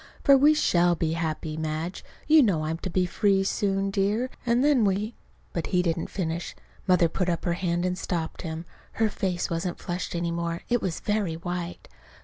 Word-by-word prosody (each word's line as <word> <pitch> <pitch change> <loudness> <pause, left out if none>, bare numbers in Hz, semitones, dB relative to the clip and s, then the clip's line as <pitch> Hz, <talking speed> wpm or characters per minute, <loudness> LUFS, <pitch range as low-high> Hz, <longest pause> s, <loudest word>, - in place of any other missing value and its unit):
For 280 - +7
we 295 +3 +6
shall 175 - +3
be 160 -1 -1
happy, 160 -1 -3
Madge. 160 +3 -3 0.2
You 310 0 +7
know 180 - +2
I'm 160 +1 -2
to 185 - -4
be 185 0 +1
free, 195 +1 +2
too, - - +1
soon, 195 0 0
dear, 210 +6 0 0.2
and 240 +2 +3
then 285 -5 +4
we 205 +3 0 0.2
" - - -34
But 170 - -2
he 180 -1 +2
didn't 165 -1 -1
finish. 170 -2 -3 0.3
Mother 180 -2 +5
put 180 +2 -1
up 170 - -1
her 175 - +1
hand 175 0 -1
and 180 0 0
stopped 170 -3 -3
him. 165 -1 -5 0.3
Her 225 -1 +2
face 180 -4 -2
wasn't 170 +1 -2
flushed 175 0 -4
any 170 0 -1
more. 170 0 -3
It 240 -1 +2
was 180 -4 -3
very 205 -6 0
white. 175 +1 -5
180 Hz, 200 wpm, -26 LUFS, 170-200 Hz, 0.3 s, For